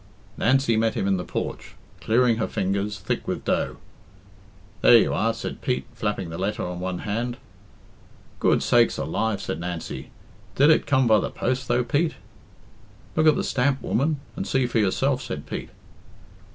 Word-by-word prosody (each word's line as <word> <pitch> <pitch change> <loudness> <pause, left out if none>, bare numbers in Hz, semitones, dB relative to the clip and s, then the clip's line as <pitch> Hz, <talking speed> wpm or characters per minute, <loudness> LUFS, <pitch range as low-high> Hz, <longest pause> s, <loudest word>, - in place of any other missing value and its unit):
Nancy 130 -2 +2
met 110 0 +1
him - - -1
in 95 -1 +2
the 90 - -3
porch, - - -5 0.2
clearing 115 0 +3
her 115 - -1
fingers, 100 +2 -1
thick 95 - -3
with - - -3
dough. - - 0 1.0
"There 120 - +8
you - - +2
are," 115 +1 +1
said 115 - -6
Pete, 125 - -1
flapping 105 -6 -3
the 80 - -6
letter 100 +3 -2
on 90 0 -5
one 90 -1 -3
hand. 120 +4 -2 1.0
"Good - - +3
sakes - - +3
alive!" 100 +8 -1
said 80 - -3
Nancy. 85 -1 -5 0.5
"Did 145 +3 +6
it 155 - +3
come 130 -2 +3
by 110 -2 +5
the - - -2
post, 130 +2 -2
though, 120 +1 +2
Pete?" 145 +7 0 1.0
"Look 155 0 +3
at 155 - +6
the - - -1
stamp, 135 +1 +1
woman, 145 +4 0 0.2
and - - -4
see 135 -1 +2
for 120 -2 0
yourself," 130 +7 +1
said 115 - -6
Pete. - - -6
115 Hz, 170 wpm, -24 LUFS, 100-130 Hz, 1.0 s, There